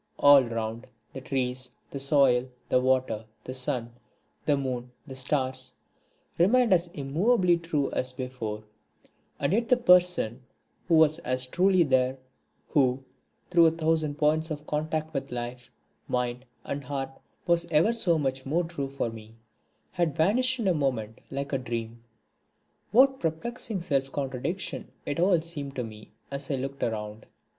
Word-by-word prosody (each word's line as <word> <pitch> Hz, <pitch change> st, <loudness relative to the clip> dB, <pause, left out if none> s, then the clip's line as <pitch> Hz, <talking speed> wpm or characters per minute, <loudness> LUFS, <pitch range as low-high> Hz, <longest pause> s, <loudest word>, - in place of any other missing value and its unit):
All 145 Hz, -1 st, +7 dB
around, 115 Hz, +1 st, -4 dB, 0.3 s
the 135 Hz, -, -6 dB
trees, 130 Hz, -1 st, -2 dB, 0.2 s
the 140 Hz, -, -5 dB
soil, 135 Hz, -3 st, +3 dB, 0.2 s
the 125 Hz, -, +3 dB
water, 130 Hz, -4 st, +1 dB, 0.2 s
the 130 Hz, -, -6 dB
sun, 125 Hz, -2 st, -2 dB, 0.6 s
the 145 Hz, -2 st, +4 dB
moon, 125 Hz, -2 st, -3 dB, 0.2 s
the 135 Hz, -3 st, -9 dB
stars, 130 Hz, -1 st, -2 dB, 0.7 s
remained 230 Hz, +5 st, +5 dB
as 175 Hz, -1 st, +2 dB
immovably 175 Hz, -, +2 dB
true 155 Hz, -4 st, -1 dB
as 130 Hz, -, -1 dB
before; 125 Hz, -5 st, -5 dB, 0.8 s
and 140 Hz, +5 st, +1 dB
yet 230 Hz, +2 st, +1 dB
the 250 Hz, -, +5 dB
person 180 Hz, -, +4 dB, 0.5 s
who 170 Hz, -, +4 dB
was 160 Hz, 0 st, +5 dB
as 130 Hz, -4 st, 0 dB
truly 185 Hz, +6 st, +3 dB
there, 130 Hz, -2 st, +2 dB, 0.5 s
who, 135 Hz, -3 st, +2 dB, 0.5 s
through 170 Hz, -2 st, +6 dB
a -, -, +3 dB
thousand 160 Hz, -2 st, 0 dB
points 155 Hz, +1 st, +2 dB
of 150 Hz, -1 st, -5 dB
contact 155 Hz, +1 st, -2 dB
with 135 Hz, -3 st, -4 dB
life, 120 Hz, 0 st, -5 dB, 0.4 s
mind, 125 Hz, 0 st, -2 dB, 0.2 s
and 140 Hz, 0 st, -4 dB
heart, 135 Hz, -1 st, -4 dB, 0.3 s
was 170 Hz, -1 st, +2 dB
ever 165 Hz, +9 st, +4 dB
so 180 Hz, -8 st, +2 dB
much 135 Hz, -3 st, -2 dB
more 160 Hz, +7 st, 0 dB
true 165 Hz, -5 st, -4 dB
for 135 Hz, -4 st, -2 dB
me, 110 Hz, 0 st, -12 dB, 0.6 s
had 170 Hz, -5 st, 0 dB
vanished 250 Hz, +10 st, +3 dB
in 225 Hz, -5 st, -1 dB
a 185 Hz, -, +4 dB
moment 125 Hz, -8 st, -2 dB
like 140 Hz, +1 st, -4 dB
a 135 Hz, -, +1 dB
dream. 115 Hz, -2 st, -5 dB, 0.9 s
What 265 Hz, +3 st, +5 dB
perplexing 205 Hz, +5 st, -3 dB
self 135 Hz, -5 st, 0 dB
contradiction 140 Hz, +7 st, -3 dB, 0.2 s
it 145 Hz, -, -2 dB
all 175 Hz, -1 st, +4 dB
seemed 145 Hz, -4 st, -6 dB
to 125 Hz, -, -2 dB
me 110 Hz, -2 st, -10 dB, 0.2 s
as 140 Hz, 0 st, -5 dB
I 140 Hz, -, +1 dB
looked 135 Hz, +1 st, -5 dB
around! 105 Hz, -1 st, -3 dB
140 Hz, 150 wpm, -27 LUFS, 130-170 Hz, 0.9 s, All